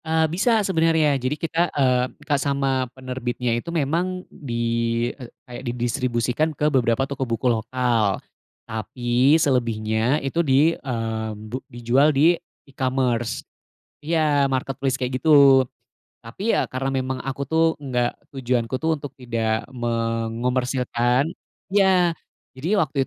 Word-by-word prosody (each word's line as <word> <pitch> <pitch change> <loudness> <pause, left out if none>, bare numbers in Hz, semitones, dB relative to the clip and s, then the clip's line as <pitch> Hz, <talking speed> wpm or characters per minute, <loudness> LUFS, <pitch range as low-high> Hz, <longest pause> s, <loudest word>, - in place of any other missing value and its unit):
Ah 160 0 +2
bisa 210 +7 +2
sebenarnya 160 -4 +3
jadi 130 +4 -1
kita, 165 +1 0
eee, 125 -2 +3
minta 150 0 -3
sama 135 -2 0
penerbitnya 125 -2 -3
itu 120 +8 -3
memang 170 +4 -1
di, 120 -5 -3 0.5
eee, 125 -4 -11 0.2
kayak 120 0 -8
di 125 -3 -3
distribusikan 120 +3 0
ke 150 0 +1
beberapa 125 0 +2
toko 140 -1 -7
buku 115 +2 -2
lokal, 115 -2 0 0.5
tapi 120 +6 +1
selebihnya 115 -3 +1
itu 165 +5 +1
di, 150 +2 +4
eee, 115 -5 -3
bu 110 +5 -6
dijual 120 +4 +2
di 160 +5 +6 0.3
e-commerce 130 -4 -1 0.6
iya 150 -3 +2
marketplace 135 0 -1
kayak 130 0 -3
gitu. 140 -3 +7 0.6
Tapi 190 - -1
ya - - +2
karena 130 +1 -3
memang 130 -1 -2
aku 135 +1 -4
tuh, 160 +4 +2
enggak 125 -4 -1 0.2
tujuan 125 -3 0
ku 130 - -2
tuh 160 0 +1
untuk 145 -1 -8
tidak 115 -2 -1
mengomersilkan 120 +2 0 0.4
iya. 185 -4 +3 0.4
Jadi 160 +11 -1
waktu 150 -7 +1
130 Hz, 130 wpm, -23 LUFS, 120-150 Hz, 0.6 s, gitu